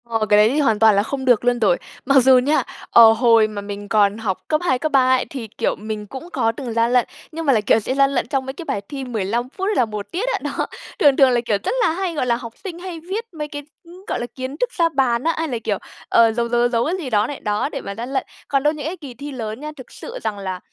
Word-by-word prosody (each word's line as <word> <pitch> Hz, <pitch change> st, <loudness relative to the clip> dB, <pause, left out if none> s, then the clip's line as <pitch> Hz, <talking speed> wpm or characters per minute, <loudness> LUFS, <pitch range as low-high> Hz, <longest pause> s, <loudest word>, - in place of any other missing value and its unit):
Ờ, 225 Hz, -2 st, -1 dB
cái 210 Hz, -, +6 dB
đấy 210 Hz, +1 st, +6 dB
thì 285 Hz, +5 st, 0 dB
hoàn 225 Hz, -7 st, +2 dB
toàn 220 Hz, -1 st, +6 dB
là 200 Hz, -, +3 dB
không 265 Hz, +3 st, -4 dB
được 245 Hz, -2 st, +3 dB
luôn 245 Hz, 0 st, +2 dB
rồi. 200 Hz, -6 st, +3 dB, 0.3 s
Mặc 275 Hz, -1 st, +5 dB
dù 260 Hz, 0 st, +7 dB
nha, 280 Hz, +5 st, +2 dB, 0.3 s
ờ, 225 Hz, -1 st, +8 dB
hồi 225 Hz, -1 st, +4 dB
mà 210 Hz, -1 st, -6 dB
mình 205 Hz, 0 st, -7 dB
còn 205 Hz, -1 st, +3 dB
học 210 Hz, -5 st, -2 dB
cấp 305 Hz, 0 st, +1 dB
2, 260 Hz, -8 st, +1 dB
cấp 310 Hz, -, -2 dB
3 260 Hz, -2 st, +4 dB
ấy, 255 Hz, -, -1 dB
thì, 250 Hz, -5 st, -6 dB
kiểu, -, -, 0 dB
mình 210 Hz, 0 st, -6 dB
cũng 270 Hz, -, -9 dB
có 225 Hz, -, +1 dB
từng 240 Hz, 0 st, -6 dB
gian 230 Hz, +1 st, +2 dB
lận. 250 Hz, -2 st, +3 dB, 0.2 s
Nhưng 325 Hz, +1 st, -5 dB
mà 275 Hz, -, +4 dB
là, 220 Hz, -, +2 dB
kiểu, 210 Hz, -, +3 dB
sẽ 255 Hz, +5 st, -3 dB
gian 275 Hz, 0 st, +4 dB
lận 270 Hz, -, -1 dB
trong 270 Hz, -2 st, -1 dB
mấy 265 Hz, -, -5 dB
cái 335 Hz, +4 st, -9 dB
bài 200 Hz, -, -2 dB
thi 275 Hz, -2 st, -5 dB
15 235 Hz, 0 st, -2 dB
phút 385 Hz, +7 st, -4 dB
hay 420 Hz, -, 0 dB
là 250 Hz, -, +3 dB
một 210 Hz, -2 st, -7 dB
tiết 390 Hz, +8 st, -2 dB
á. -, -, -1 dB
Đó, -, -, -2 dB, 0.3 s
thường 285 Hz, -3 st, +5 dB
thường 270 Hz, -2 st, +6 dB
là, 240 Hz, -1 st, +2 dB
kiểu, 215 Hz, -3 st, +1 dB
rất -, -, -1 dB
là 330 Hz, -, +3 dB
hay, 365 Hz, +1 st, -2 dB
gọi 290 Hz, -, 0 dB
là, 240 Hz, -1 st, +2 dB
học 230 Hz, -1 st, -8 dB
sinh 350 Hz, -3 st, -6 dB
hay 355 Hz, -2 st, -7 dB
viết 385 Hz, +8 st, -4 dB
mấy 300 Hz, -2 st, -5 dB
cái, 290 Hz, -1 st, -7 dB, 0.2 s
ừm, 355 Hz, +2 st, -15 dB
gọi -, -, -2 dB
là, 240 Hz, -, -3 dB
kiến 260 Hz, +2 st, -5 dB
thức -, -, 0 dB
ra 335 Hz, -6 st, +2 dB
bàn 260 Hz, -5 st, +1 dB
á, 330 Hz, -, +2 dB
hay 325 Hz, 0 st, -1 dB
là, 250 Hz, -5 st, -2 dB
kiểu, 205 Hz, -2 st, 0 dB, 0.3 s
ờ, 230 Hz, -1 st, +5 dB
giấu, 235 Hz, +1 st, -1 dB
giấu, 240 Hz, 0 st, +2 dB
giấu, 240 Hz, -, +3 dB
giấu 235 Hz, -1 st, +1 dB
cái 350 Hz, +4 st, -1 dB
gì 265 Hz, -, -4 dB
đó 210 Hz, -1 st, +2 dB
này, 285 Hz, -, -6 dB
đó, 210 Hz, +6 st, -1 dB
để 275 Hz, -, -5 dB
mà 200 Hz, -, -6 dB
gian 240 Hz, +5 st, -6 dB
lận. 265 Hz, -, 0 dB, 0.2 s
Còn 275 Hz, -1 st, +1 dB
đâu 300 Hz, +1 st, +3 dB
những 295 Hz, -2 st, -7 dB
cái 340 Hz, +4 st, -4 dB
kỳ 280 Hz, -7 st, -9 dB
thi 285 Hz, +5 st, -8 dB
lớn 225 Hz, -3 st, -5 dB
nha, 300 Hz, +1 st, -6 dB
thực 260 Hz, -, -12 dB
sự -, -, -8 dB
rằng 205 Hz, -, -2 dB
là, 190 Hz, -2 st, -4 dB
255 Hz, 305 wpm, -20 LUFS, 225-295 Hz, 0.3 s, ờ